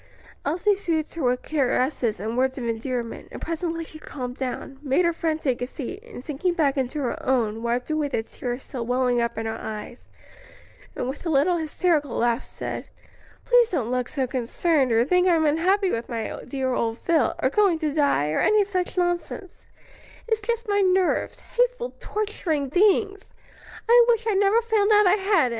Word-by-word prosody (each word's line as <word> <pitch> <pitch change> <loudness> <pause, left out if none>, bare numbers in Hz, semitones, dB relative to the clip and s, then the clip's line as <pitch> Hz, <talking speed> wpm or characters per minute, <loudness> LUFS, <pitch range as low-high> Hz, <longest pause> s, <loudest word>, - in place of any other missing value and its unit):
Elsie 350 +8 +2
soothed 330 -6 -2
her 335 - -5
with 250 -1 +1
caresses 255 - 0
and 220 +4 -3
words 260 +1 +1
of 255 - -4
endearment, 235 +1 -3
and - - -7
presently 330 0 -3
she 315 -1 -11
calmed 250 -5 -6
down, 265 +1 -5
made 295 +5 +2
her 340 - +2
friend 320 -1 -2
take 255 -4 0
a 245 - -1
seat, 325 - -7
and 455 - -11
sinking 335 +5 -1
back 290 -5 +2
into 265 +1 -2
her 245 - -3
own, 225 -4 0
wiped 240 +4 -1
away 310 -1 0
the 230 -5 -2
tears 245 +2 -5
still 245 -3 -5
welling 245 0 +1
up 235 0 -2
in 225 - -3
her 225 0 -3
eyes, 220 +3 -7 0.9
and 250 - -3
with 265 +3 -5
a 340 - -2
little 320 +4 +3
hysterical 310 -3 0
laugh 235 +1 +1
said, - - -6 0.6
"Please - - +5
don't 245 -9 -1
look 250 -1 0
so 270 -3 -1
concerned, 260 +3 0
or 230 +1 +4
think 360 +5 +3
I'm 330 -3 +3
unhappy 365 +6 +2
with 230 +1 -3
my 225 -2 -3
dear 265 -2 -1
old 230 -2 -1
Phil, 315 -7 +1
or 260 - +1
going 395 -3 +3
to 310 -2 -2
die, 280 - +2
or - - 0
any 425 -1 +4
such 370 -2 -3
nonsense: 350 +1 -2 0.6
it's 445 -1 0
just 470 0 -2
my 405 -1 +2
nerves; 370 -1 +1
hateful, - - -1
torturing 335 -10 -2
things! 400 +2 +2 0.5
I 475 +1 +7
wish 460 -1 +2
I'd 420 -4 +2
never 410 +4 +3
found 440 -2 +2
out 420 0 +6
I 365 - +5
had 395 -3 +3
any." - - 0
305 Hz, 190 wpm, -24 LUFS, 250-375 Hz, 0.9 s, I